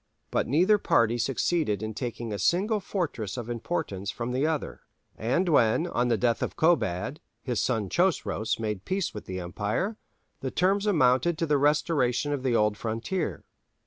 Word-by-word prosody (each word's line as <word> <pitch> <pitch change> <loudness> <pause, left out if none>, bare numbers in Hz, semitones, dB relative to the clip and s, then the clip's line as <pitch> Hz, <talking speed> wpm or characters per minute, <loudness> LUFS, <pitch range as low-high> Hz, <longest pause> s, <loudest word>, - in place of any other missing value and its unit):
But - - 0
neither 185 - +4
party 115 - +2
succeeded 125 - 0
in 110 0 -3
taking 120 -2 -4
a 100 - -4
single 195 - +2
fortress 150 - -3
of 120 -1 -4
importance 115 - -3
from 120 +3 -3
the 135 +4 +1
other; 160 -2 -3 0.3
and 130 +12 0
when, 145 0 +3
on 125 -8 0
the 115 -2 +2
death 120 +2 +1
of - - -2
Kobad, 150 - +1 0.2
his 125 -4 -1
son 110 -5 0
Chosroës 165 - 0
made 105 -4 -3
peace 190 - -2
with 105 - -8
the 95 0 -4
empire, 105 - -2 0.4
the 135 - -3
terms 195 +7 +1
amounted 155 -2 +3
to 165 - 0
the 145 -2 +2
restoration 145 -2 +2
of 140 - -2
the 130 -2 +1
old 105 -1 +2
frontier. 115 - -3
125 Hz, 170 wpm, -27 LUFS, 110-170 Hz, 0.4 s, neither